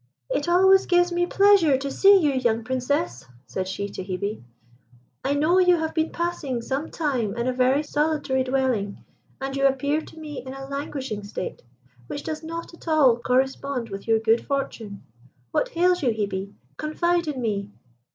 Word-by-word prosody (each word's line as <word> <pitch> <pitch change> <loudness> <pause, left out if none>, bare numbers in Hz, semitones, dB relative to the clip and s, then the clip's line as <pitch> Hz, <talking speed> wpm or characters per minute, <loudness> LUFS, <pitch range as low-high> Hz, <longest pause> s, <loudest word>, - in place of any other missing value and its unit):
"It 290 - 0
always 380 +2 +5
gives 355 -1 +3
me 350 0 +1
pleasure 390 -8 +5
to 275 +1 -4
see 395 +5 +6
you, 300 -5 +2
young 240 -4 0
Princess," 250 - -2 0.2
said 185 +10 -4
she 195 +2 -3
to 190 - -6
Hebe. 200 +3 -4 0.8
"I 280 +2 +1
know 320 +6 +3
you 360 -1 +5
have 320 -1 -2
been 320 0 0
passing 295 -8 -3
some 275 +6 -3
time 250 -10 -1
in 235 - -1
a 255 - +1
very 260 +3 +2
solitary 295 -3 0
dwelling, 255 -6 -1 0.3
and 270 0 -4
you 275 0 +4
appear 280 +3 0
to 320 - -14
me 300 -3 -7
in 260 0 -8
a 270 0 -7
languishing 270 -6 -4
state, 200 -2 -6 0.5
which 290 - -5
does 310 -1 -4
not 335 +1 -6
at 340 - -15
all 290 -7 +5
correspond 260 0 0
with 195 +1 -7
your 225 0 +4
good 225 +1 +2
fortune. 230 -7 -4 0.5
What - - 0
hails 360 +1 +2
you, 260 - +2
Hebe? 200 -3 -2 0.3
Confide 340 +2 0
in 290 -4 -3
me." 205 -4 -2
270 Hz, 175 wpm, -24 LUFS, 230-315 Hz, 0.8 s, see